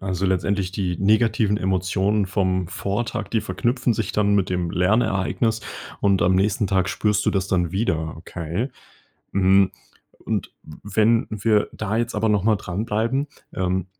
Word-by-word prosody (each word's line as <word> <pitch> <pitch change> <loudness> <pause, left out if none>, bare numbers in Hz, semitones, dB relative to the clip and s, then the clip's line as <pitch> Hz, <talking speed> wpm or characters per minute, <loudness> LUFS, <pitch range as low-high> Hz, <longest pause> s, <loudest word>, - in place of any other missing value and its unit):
Also, 95 0 -2
letztendlich 95 0 0
die 90 -2 -2
negativen 110 0 +3
Emotionen 95 +2 0
vom 95 -2 0
Vortag, 100 +5 -3
die 115 - +1
verknüpfen 120 +3 0
sich 110 0 -2
dann 100 -1 +2
mit 95 - +1
dem 90 -2 -1
Lernereignis 105 +4 +1 0.4
und 100 -3 +3
am 90 +2 +3
nächsten 100 +1 +1
Tag 95 -1 +1
spürst 105 +2 0
du - - +4
das 95 -1 -1
dann 90 -2 0
wieder, 80 -7 -1
okay? 85 - -4 0.6
Hm, 95 0 +4 0.6
und - - -2
w 75 - -13
wenn 115 +2 +3
wir 105 0 +1
da 110 0 -3
jetzt 120 +1 -1
aber 110 +1 +1
noch 105 -3 +2
mal 110 -1 +4
dranbleiben, 110 +8 -1 0.3
ähm, 95 0 -1
100 Hz, 155 wpm, -23 LUFS, 95-110 Hz, 0.6 s, du